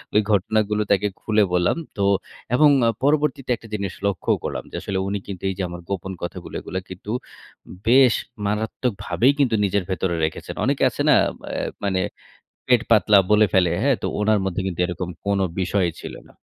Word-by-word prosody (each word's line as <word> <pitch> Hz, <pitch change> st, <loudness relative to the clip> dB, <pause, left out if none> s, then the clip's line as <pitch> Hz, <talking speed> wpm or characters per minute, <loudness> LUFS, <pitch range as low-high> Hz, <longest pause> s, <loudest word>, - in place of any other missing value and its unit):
ওই 105 Hz, -, +6 dB
ঘটনাগুলো 105 Hz, +1 st, +1 dB
তাকে 100 Hz, +1 st, +3 dB
খুলে 110 Hz, -1 st, +3 dB
বললাম। 90 Hz, -, +2 dB, 0.2 s
তো 100 Hz, -, 0 dB, 0.5 s
এবং 150 Hz, +3 st, +6 dB, 0.3 s
পরবর্তীতে 145 Hz, -3 st, +1 dB
একটা 115 Hz, -, -14 dB
জিনিস 100 Hz, -3 st, -3 dB
লক্ষ্যও 95 Hz, -5 st, 0 dB
করলাম। -, -, -3 dB
যে -, -, -8 dB
আসলে 95 Hz, -1 st, -2 dB
উনি 100 Hz, -, -2 dB
কিন্তু 95 Hz, -2 st, -7 dB
এই -, -, -6 dB
যে -, -, 0 dB
আমার 85 Hz, -, -8 dB, 0.2 s
গোপন 95 Hz, -1 st, -3 dB
কথাগুলো 90 Hz, 0 st, -6 dB, 0.3 s
কিন্তু 95 Hz, +3 st, -7 dB, 0.8 s
বেশ 125 Hz, -1 st, +6 dB, 0.3 s
মারাত্মকভাবেই 110 Hz, +4 st, 0 dB
কিন্তু 125 Hz, -5 st, +3 dB
নিজের 100 Hz, 0 st, 0 dB
ভেতরে 90 Hz, -1 st, -1 dB
রেখেছেন। 80 Hz, -, -5 dB
অনেকে -, -, +1 dB
আছে -, -, -5 dB
না -, -, +7 dB, 0.4 s
আ -, -, -4 dB, 0.3 s
মানে 95 Hz, -2 st, +1 dB, 0.7 s
পেট 125 Hz, -2 st, +4 dB
পাতলা 105 Hz, -2 st, +6 dB
বলে 105 Hz, 0 st, +6 dB
ফেলে 90 Hz, -3 st, +4 dB
হ্যাঁ 140 Hz, -2 st, +3 dB
তো -, -, -1 dB
উনার 105 Hz, -1 st, +3 dB
মধ্যে 95 Hz, 0 st, -2 dB
কিন্তু 90 Hz, -2 st, -3 dB
এরকম 90 Hz, 0 st, -4 dB, 0.2 s
কোনো 100 Hz, -1 st, +1 dB, 0.2 s
বিষয়ই 90 Hz, -2 st, +1 dB
ছিল -, -, -7 dB
না। -, -, -18 dB
100 Hz, 170 wpm, -22 LUFS, 95-110 Hz, 0.8 s, না